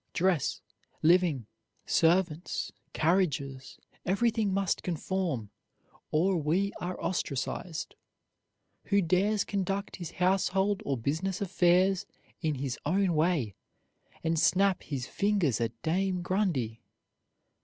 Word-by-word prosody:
Dress, 180 -5 +1 0.4
living, 165 -7 +4 0.4
servants, 170 0 +1 0.2
carriages, 145 -6 0 0.3
everything 215 +2 +1
must 195 -1 0
conform, 170 - -2 0.6
or 180 +4 +2
we 175 +6 +1
are 180 +1 -4
ostracized. 160 0 -3 0.9
Who 200 -1 +3
dares 195 +5 +2
conduct 200 0 -2
his 170 -3 -7
household 190 +2 +1
or 135 -2 +1
business 160 +10 -1
affairs 185 0 +3 0.3
in 155 -3 0
his 135 -1 -3
own 185 +3 +2
way, 155 - +1 0.7
and 165 -1 +1
snap 185 +3 +3
his 135 -4 -4
fingers 180 - +1
at 115 0 -2
Dame 180 +2 0
Grundy? 165 - 0
180 Hz, 100 wpm, -30 LUFS, 150-195 Hz, 0.9 s, living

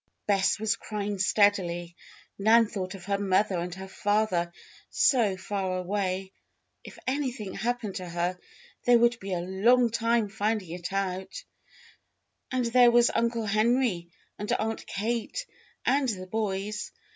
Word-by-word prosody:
Bess 195 -2 +2
was 220 +1 0
crying 205 -2 -4
steadily. 185 -4 +2 0.4
Nan 225 +3 +6
thought 195 -2 -5
of 180 -2 -11
her 200 0 0
mother 195 -1 +2
and 175 +1 -4
her 190 +1 -8
father, 200 -3 0 0.4
so 220 -8 +3
far 190 -1 -2
away. 190 0 -2 0.5
If - - -11
anything 255 -7 -2
happened 235 -3 -2
to 180 -1 -6
her 175 +1 -2 0.5
they 245 -1 +6
would 235 0 +3
be 195 0 -6
a 175 - -1
long 230 +7 +3
time 230 -1 +1
finding 210 -3 -2
it 175 +1 -5
out. 195 - -3 1.1
And 255 -2 0
there 240 +1 +6
was 240 0 +5
Uncle 230 -1 0
Henry 215 -4 +1 0.3
and 210 - -3
Aunt 220 +1 -2
Kate 235 - -2 0.4
and 270 -1 +2
the 185 -4 -4
boys! 210 +1 -3
205 Hz, 140 wpm, -28 LUFS, 190-230 Hz, 1.1 s, Nan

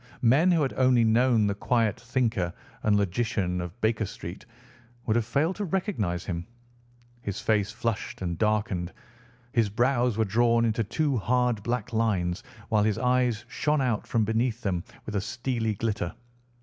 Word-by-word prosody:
Men 140 +10 +5
who 165 -3 +3
had 135 - -1
only 130 -2 +4
known 115 0 +4
the 100 - +1
quiet 115 +2 +1
thinker 120 -7 0 0.3
and 105 -1 +3
logician 95 -2 0
of 90 +6 -7
Baker 110 -1 +1
Street 90 +8 -8 0.6
would 110 - +1
have 115 -2 +1
failed 150 +9 +1
to 210 - -2
recognise 155 - -1
him. 85 -2 -4 0.7
His 100 -4 -4
face 105 -2 +1
flushed 115 -1 -3
and 85 -1 -1
darkened. 105 -5 0 0.6
His 115 -4 +2
brows 120 +1 +1
were 110 - +2
drawn 115 +3 +3
into 115 0 +1
two 145 +5 0
hard 125 0 +1
black 120 +2 -3
lines, 100 -5 0 0.3
while 110 -2 +3
his 105 0 +1
eyes 125 -3 +1
shone 150 0 0
out 125 -5 0
from 115 -3 +1
beneath 115 +2 0
them 90 -5 -1 0.2
with 105 - -5
a - - 0
steely 115 -1 -2
glitter. 105 -5 -2
115 Hz, 160 wpm, -27 LUFS, 105-125 Hz, 0.7 s, Men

